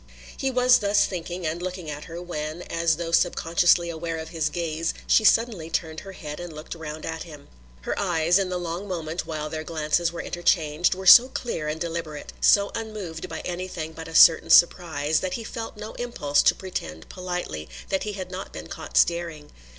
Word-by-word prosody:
He 270 Hz, -, -1 dB
was 250 Hz, -1 st, +5 dB
thus 205 Hz, 0 st, +3 dB
thinking, 175 Hz, -1 st, -5 dB
and 160 Hz, +2 st, -2 dB
looking 180 Hz, -2 st, -5 dB
at 150 Hz, 0 st, -6 dB
her, 165 Hz, +1 st, -7 dB
when, 165 Hz, -1 st, -5 dB
as 165 Hz, -1 st, 0 dB
though 170 Hz, -1 st, -4 dB
sub 170 Hz, +1 st, +3 dB
consciously 170 Hz, +1 st, +3 dB
aware 165 Hz, 0 st, -4 dB
of 160 Hz, 0 st, -6 dB
his 160 Hz, -2 st, -1 dB
gaze, 165 Hz, 0 st, -2 dB
she 220 Hz, -, +4 dB
suddenly 215 Hz, -7 st, +3 dB
turned 160 Hz, -1 st, -2 dB
her 195 Hz, -1 st, -10 dB
head 150 Hz, -4 st, -7 dB
and 175 Hz, -1 st, -7 dB
looked 155 Hz, 0 st, -8 dB
round 155 Hz, -2 st, -7 dB
at 160 Hz, 0 st, -4 dB
him. 150 Hz, -4 st, -11 dB, 0.3 s
Her -, -, -2 dB
eyes, 175 Hz, -2 st, +2 dB
in 190 Hz, -2 st, -1 dB
the 180 Hz, -, -2 dB
long 175 Hz, +3 st, -4 dB
moment 165 Hz, -2 st, -4 dB
while 155 Hz, -2 st, -3 dB
their 155 Hz, +1 st, -5 dB
glances 160 Hz, +1 st, 0 dB
were 170 Hz, -, -6 dB
interchanged, 170 Hz, -1 st, +1 dB
were 190 Hz, +1 st, -7 dB
so 240 Hz, +7 st, +10 dB
clear 235 Hz, -12 st, -4 dB
and 155 Hz, +1 st, -3 dB
deliberate, 165 Hz, -3 st, -5 dB
so 200 Hz, 0 st, +5 dB
unmoved 210 Hz, -8 st, -6 dB
by -, -, -5 dB
anything 175 Hz, -3 st, -5 dB
but 165 Hz, 0 st, -8 dB
a 165 Hz, -, -9 dB
certain 165 Hz, -, +7 dB
surprise, 160 Hz, -4 st, +4 dB
that 185 Hz, -1 st, -3 dB
he 230 Hz, -, -5 dB
felt 225 Hz, 0 st, -6 dB
no 215 Hz, +1 st, -7 dB
impulse 150 Hz, -13 st, 0 dB
to -, -, +4 dB
pretend 80 Hz, -, -6 dB
politely 180 Hz, -, -5 dB, 0.2 s
that 190 Hz, -, 0 dB
he 210 Hz, -, -3 dB
had 185 Hz, -2 st, -6 dB
not 185 Hz, +1 st, -6 dB
been -, -, -8 dB
caught -, -, -6 dB
staring. 170 Hz, -3 st, +1 dB
170 Hz, 200 wpm, -25 LUFS, 160-185 Hz, 0.3 s, so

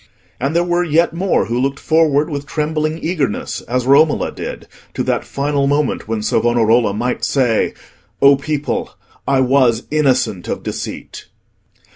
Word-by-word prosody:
And 140 Hz, +5 st, -2 dB
there 170 Hz, -, +3 dB
were 175 Hz, 0 st, +1 dB
yet 165 Hz, 0 st, +2 dB
more 180 Hz, -, +1 dB
who 120 Hz, +3 st, -2 dB
looked 135 Hz, +1 st, -1 dB
forward 155 Hz, -2 st, +2 dB
with 145 Hz, -2 st, -5 dB
trembling 155 Hz, +1 st, -1 dB
eagerness, 150 Hz, -, -2 dB
as 125 Hz, +1 st, -1 dB
Romola 145 Hz, +3 st, +3 dB
did, -, -, -7 dB, 0.3 s
to -, -, -1 dB
that -, -, -1 dB
final 140 Hz, 0 st, -1 dB
moment 145 Hz, -4 st, 0 dB
when 110 Hz, -1 st, -2 dB
Savonarola 115 Hz, -1 st, +2 dB
might 120 Hz, +5 st, -2 dB
say, 125 Hz, -5 st, +1 dB, 0.4 s
"O 140 Hz, 0 st, +6 dB
people, 145 Hz, +1 st, -3 dB, 0.3 s
I 135 Hz, -1 st, +3 dB
was 125 Hz, -3 st, +3 dB
innocent 130 Hz, -, +1 dB
of -, -, -4 dB
deceit." -, -, -6 dB
140 Hz, 145 wpm, -17 LUFS, 125-155 Hz, 0.4 s, O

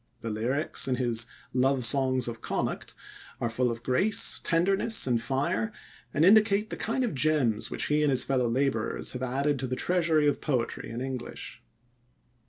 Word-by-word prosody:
The 115 Hz, -, -4 dB
lyrics 125 Hz, +10 st, 0 dB
in 130 Hz, -, +1 dB
his 120 Hz, -2 st, +1 dB, 0.3 s
Love 130 Hz, 0 st, +2 dB
Songs 130 Hz, 0 st, +3 dB
of 115 Hz, -1 st, -6 dB
Connacht -, -, -3 dB, 0.4 s
are 120 Hz, -, -2 dB
full 125 Hz, +2 st, +1 dB
of 115 Hz, 0 st, -5 dB
grace, 185 Hz, -, +1 dB
tenderness, 195 Hz, +6 st, +1 dB
and 120 Hz, -3 st, +1 dB
fire, 115 Hz, -3 st, -1 dB, 0.4 s
and 150 Hz, +6 st, +2 dB
indicate 210 Hz, +1 st, +4 dB
the -, -, -3 dB
kind 245 Hz, +4 st, -1 dB
of 240 Hz, -, -1 dB
gems 135 Hz, -6 st, +1 dB
which -, -, -3 dB
he 150 Hz, +1 st, +1 dB
and 150 Hz, -, +3 dB
his 130 Hz, -2 st, +3 dB
fellow 125 Hz, -3 st, 0 dB
laborers 125 Hz, -3 st, -1 dB
have 125 Hz, -, -6 dB
added 135 Hz, +2 st, 0 dB
to 130 Hz, -, -2 dB
the 130 Hz, -, -2 dB
treasury 165 Hz, -2 st, +2 dB
of 145 Hz, -, 0 dB
poetry 125 Hz, -6 st, -2 dB
in 115 Hz, +2 st, -5 dB
English. 130 Hz, -1 st, -6 dB
130 Hz, 175 wpm, -28 LUFS, 120-155 Hz, 0.4 s, indicate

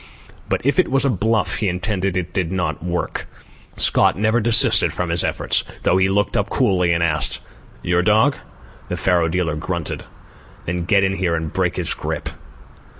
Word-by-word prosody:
But -, -, -1 dB
if 140 Hz, +6 st, +2 dB
it 185 Hz, -, +3 dB
was 135 Hz, 0 st, +3 dB
a 135 Hz, -, +3 dB
bluff 110 Hz, +2 st, 0 dB
he 105 Hz, -, 0 dB
intended, 95 Hz, 0 st, -2 dB
it 90 Hz, -1 st, -4 dB
did 90 Hz, -3 st, -1 dB
not 80 Hz, -4 st, -2 dB
work. 90 Hz, 0 st, -3 dB, 0.5 s
Scott -, -, +3 dB
never 110 Hz, +3 st, +2 dB
desisted 115 Hz, 0 st, +4 dB
from 90 Hz, -2 st, -3 dB
his 85 Hz, 0 st, +3 dB
efforts, -, -, 0 dB, 0.2 s
though 90 Hz, -, +3 dB
he 95 Hz, 0 st, +3 dB
looked 100 Hz, +1 st, 0 dB
up 100 Hz, -, 0 dB
coolly 95 Hz, -9 st, +2 dB
and 85 Hz, 0 st, +1 dB
asked: 75 Hz, -3 st, -1 dB, 0.4 s
"Your 85 Hz, 0 st, +2 dB
dog?" 110 Hz, +9 st, +3 dB, 0.5 s
The 90 Hz, -, -3 dB
faro 90 Hz, -2 st, +2 dB
dealer 80 Hz, -2 st, -1 dB
grunted. 85 Hz, +1 st, -4 dB, 0.6 s
"Then 85 Hz, 0 st, -3 dB
get 100 Hz, +1 st, +3 dB
in 95 Hz, 0 st, 0 dB
here 90 Hz, -3 st, 0 dB
and 80 Hz, -2 st, -4 dB
break -, -, 0 dB
this -, -, -1 dB
grip." -, -, -4 dB
90 Hz, 180 wpm, -20 LUFS, 85-105 Hz, 0.6 s, desisted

